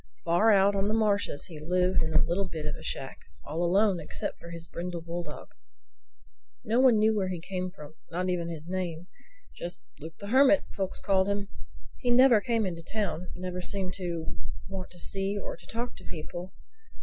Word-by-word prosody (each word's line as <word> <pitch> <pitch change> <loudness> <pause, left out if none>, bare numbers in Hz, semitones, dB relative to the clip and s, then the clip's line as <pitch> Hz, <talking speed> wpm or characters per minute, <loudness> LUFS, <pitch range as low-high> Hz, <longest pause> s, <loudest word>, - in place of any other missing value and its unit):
Far 210 +7 +5
out 200 0 +5
on 195 0 +1
the 215 - +2
marshes 205 -8 +2
he 160 -4 -9
lived 180 +4 +2
in 160 0 -1
a 155 - +5
little 180 +4 0
bit 160 -3 -5
of 150 - -2
a - - -10
shack—all 145 - -5
alone 190 +1 +4
except 155 - -4
for 170 - -10
his 170 -1 -7
brindle 170 0 -5
bulldog. 170 +1 -6 1.1
No 225 +3 +2
one 255 -4 +7
knew 215 +1 +4
where 195 -3 +1
he 180 -2 -3
came 185 +2 -3
from—not 165 +1 -6
even 175 -2 0
his 165 -1 -6
name. 175 -2 -3 0.5
Just 175 +1 -6
"Luke 160 +1 -8
the 200 - -6
Hermit" 270 +4 +6
folks 195 -2 -2
called 190 -1 +3
him. 200 0 -1 0.5
He 245 - 0
never 240 -2 +7
came 230 -3 +1
into 170 -3 -3
the 165 - -8
town; 190 -5 -1
never 180 0 -4
seemed 185 0 -1
to 170 - -3 0.3
want 190 -1 -5
to 180 - -15
see 195 +3 +1
or 200 - -4
talk 230 +8 -5
to - - -11
people. 175 +3 -7
185 Hz, 185 wpm, -29 LUFS, 170-200 Hz, 1.1 s, one